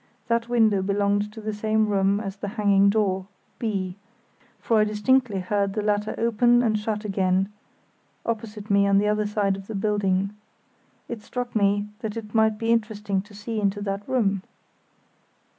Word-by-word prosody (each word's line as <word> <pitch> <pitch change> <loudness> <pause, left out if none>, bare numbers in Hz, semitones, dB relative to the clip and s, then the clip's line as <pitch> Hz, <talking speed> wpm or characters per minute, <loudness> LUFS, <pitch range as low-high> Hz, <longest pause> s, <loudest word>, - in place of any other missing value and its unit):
That 230 0 +1
window 220 -5 +3
belonged 200 +1 0
to 220 - -10
the 215 0 -3
same 215 +1 +1
room 200 0 +2
as 195 -2 -5
the 200 - -5
banging 200 -1 +4
door 195 -3 0 0.3
(B); 195 -5 -2 0.6
for 225 -2 +1
I - - +5
distinctly 215 0 +1
heard 200 +1 0
the 210 - -2
latter 210 0 0
open 240 +1 +3
and 220 -2 +2
shut 210 0 -3
again, 190 -1 +1 0.8
opposite 215 -2 -4
me 200 0 +4
on 200 0 +4
the 205 +1 +3
other 210 0 +1
side 205 -2 +1
of 195 0 -10
the 220 - -5
building. 195 -1 +1 0.8
It 235 -3 -6
struck 245 +2 -5
me 205 0 +2
that 220 -2 -4
it 210 -2 -7
might 220 -1 +3
be 225 +1 0
interesting 210 -3 0
to 205 +1 -16
see 215 +1 -4
into 200 0 0
that 195 0 -2
room. 200 -7 +1
210 Hz, 170 wpm, -25 LUFS, 200-220 Hz, 0.8 s, I